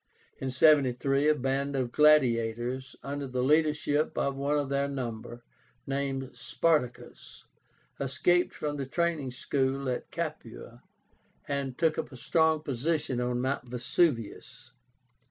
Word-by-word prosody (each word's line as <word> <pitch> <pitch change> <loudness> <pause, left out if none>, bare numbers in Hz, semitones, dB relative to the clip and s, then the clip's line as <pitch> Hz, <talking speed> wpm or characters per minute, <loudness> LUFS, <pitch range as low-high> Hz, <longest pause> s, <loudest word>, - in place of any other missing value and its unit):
In 135 - -3
73 135 0 +3
a 155 - +5
band 140 +1 -1
of 125 -3 -1
gladiators, 125 -3 +2
under 140 0 -4
the 125 -1 -2
leadership 150 +1 +2
of 140 0 0
one 140 +2 0
of 145 -2 -1
their 140 0 0
number, 120 -3 -6 0.4
named 135 -1 -2
SPARTACUS 150 -7 -2 0.6
escaped 175 +6 +2
from 145 -1 -3
the 135 -2 -4
training 165 -2 -1
school 135 +2 -1
at 125 - -3
Capua - - -6 0.7
and 140 -2 -3
took 160 -2 +1
up - - -4
a 130 - -10
strong 160 +4 +2
position 140 -1 -1
on 125 0 -1
Mount 130 -1 -2
Vesuvius. 125 - -1
135 Hz, 125 wpm, -29 LUFS, 125-150 Hz, 0.7 s, a